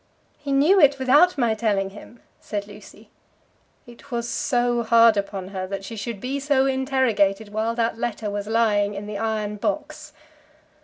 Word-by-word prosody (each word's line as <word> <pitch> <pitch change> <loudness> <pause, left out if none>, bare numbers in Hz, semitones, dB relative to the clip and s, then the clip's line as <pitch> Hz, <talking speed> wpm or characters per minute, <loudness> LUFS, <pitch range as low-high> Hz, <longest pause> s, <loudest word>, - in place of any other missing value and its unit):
"He 290 -1 -5
knew 300 +9 +4
it 285 -3 +5
without 290 +7 +4
my 235 -4 +2
telling 205 -3 -1
him," 220 +3 -14 0.2
said 205 -1 -5
Lucy. 205 +1 -15 0.7
It 240 +4 -16
was 235 -2 -3
so 240 -1 0
hard 230 -1 +5
upon 200 -2 -4
her 190 -1 -5
that 195 0 -6
she 230 - -7
should 220 0 -5
be 265 +6 -3
so 280 -1 +2
interrogated 260 -7 +1
while 220 +2 -2
that 230 -1 -1
letter 225 -2 -3
was 205 0 -4
lying 210 -2 +1
in 200 +1 -6
the 205 -1 -6
iron 215 -2 -2
box! 305 +4 -4
230 Hz, 165 wpm, -23 LUFS, 205-265 Hz, 0.7 s, it